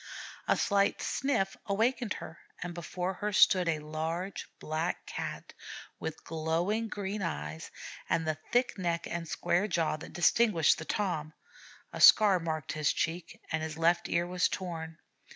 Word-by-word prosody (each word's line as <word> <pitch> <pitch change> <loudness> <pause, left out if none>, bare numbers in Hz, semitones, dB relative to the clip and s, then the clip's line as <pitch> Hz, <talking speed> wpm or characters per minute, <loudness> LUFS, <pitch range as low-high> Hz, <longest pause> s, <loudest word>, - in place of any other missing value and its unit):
A - - +3
slight 200 -1 +2
'sniff' 250 -8 0
awakened 225 +2 +1
her, 165 +3 -9 0.2
and 175 -1 -5
before 180 +2 -3
her 210 +3 -3
stood 185 -3 +5
a 160 - +1
large 160 +5 -4
Black 160 +2 -2
Cat - - -6 0.5
with 160 0 -5
glowing 165 +8 -1
green 205 -1 -4
eyes, 75 - -4 0.4
and 165 - +1
the 155 -1 -1
thick 245 -3 +2
neck 170 -2 -1
and 170 -1 -4
square 190 +4 +1
jaws 165 -5 0
that - - -10
distinguish 175 -2 +4
the 160 - -7
Tom; 160 -7 -2 0.6
a - - -4
scar 200 -4 +8
marked 160 -3 -3
his 155 -1 +1
cheek, 165 +1 -3
and 160 -1 0
his 155 -1 -4
left 170 +1 +2
ear 170 0 +1
was 180 +1 +1
torn. 165 -4 -5
170 Hz, 150 wpm, -31 LUFS, 160-195 Hz, 0.6 s, scar